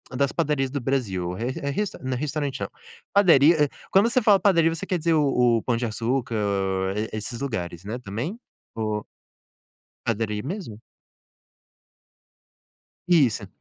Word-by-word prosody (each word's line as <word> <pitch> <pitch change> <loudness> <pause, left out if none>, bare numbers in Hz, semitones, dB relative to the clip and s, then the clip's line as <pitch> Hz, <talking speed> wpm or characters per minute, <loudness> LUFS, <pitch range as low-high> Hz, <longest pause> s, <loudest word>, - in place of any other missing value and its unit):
das 140 +1 +1
padarias 135 -2 0
do 140 +2 -3
Brasil? 100 -10 -1
Re 115 +7 -3 0.2
re 210 - 0 0.2
não 130 -1 -1
restaurante 145 -1 -3
não, - - -2 0.4
padaria 160 -5 +5 0.2
quando 205 +5 +4
você 255 - +3
fala 205 -3 +5
padaria 170 -4 +4
você 165 - -5
quer 180 -3 -1
dizer 165 +1 +1
o 125 -6 +3
o 110 - -4
Pão 120 - +1
de 120 0 -1
Açúcar, 115 +2 -2
hã, 95 -2 0 0.2
esses 110 +2 -5
lugares, 90 -10 -4
né, 110 +4 -4
também? 125 - -5 0.4
Ou 110 -2 -2 1.0
Padaria 105 -2 -1
mesmo? 145 - -6 2.3
Isso. 130 - +3
125 Hz, 135 wpm, -25 LUFS, 110-155 Hz, 2.3 s, padaria